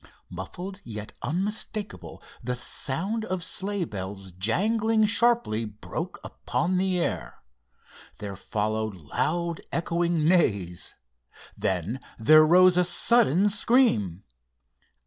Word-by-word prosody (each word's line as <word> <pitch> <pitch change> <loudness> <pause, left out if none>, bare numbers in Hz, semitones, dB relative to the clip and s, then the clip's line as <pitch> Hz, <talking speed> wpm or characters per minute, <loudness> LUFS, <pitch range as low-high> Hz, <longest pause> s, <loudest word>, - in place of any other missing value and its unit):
Muffled 175 - -7
yet 105 -2 -7
unmistakable, 205 +4 -3 0.2
the 125 - -2
sound 185 - -2
of 185 -3 -3
sleigh 195 0 -2
bells 95 - -7
jangling 215 - +1
sharply 225 - +2
broke 110 - -6
upon 180 +1 -1
the 185 -1 +1
air. 170 - -3 0.7
There 100 -1 -6
followed 110 +2 -2
loud 165 - -2
echoing 170 -1 0
neighs. 100 - +1 0.6
Then 95 +7 -2 0.2
there 155 +8 +7
rose 180 +3 +6
a 180 - +5
sudden 195 - +3
scream. 200 - +2
170 Hz, 100 wpm, -26 LUFS, -, 0.7 s, there